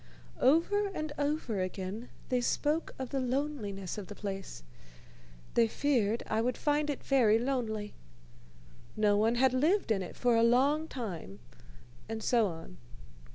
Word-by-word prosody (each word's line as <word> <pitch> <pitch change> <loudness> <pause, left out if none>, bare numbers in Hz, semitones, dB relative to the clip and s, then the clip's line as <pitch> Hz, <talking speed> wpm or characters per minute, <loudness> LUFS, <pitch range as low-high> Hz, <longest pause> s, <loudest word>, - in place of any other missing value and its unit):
Over 345 +9 +3
and 310 -1 -3
over 285 -8 -1
again 190 +5 -4 0.2
they 250 -1 +1
spoke 300 +6 0
of 260 -2 -5
the 275 - 0
loneliness 245 - -2
of 195 - -8
the 205 - -8
place. 195 - -6 0.9
They 235 -1 +4
feared 235 -4 +1
I 220 - 0
would 245 +1 -1
find 295 0 +1
it 285 - -3
very 235 -6 +4
lonely. 225 -4 -2 1.0
No 210 -1 +4
one 220 +3 +3
had 260 +1 +3
lived 310 - +2
in 200 -3 +2
it 180 - -7
for 245 -1 +2
a 230 - +4
long 275 +7 +3
time, 180 - -6 0.7
and 220 -1 -4
so 235 -4 +3
on. 165 - -8
240 Hz, 150 wpm, -31 LUFS, 210-280 Hz, 1.0 s, They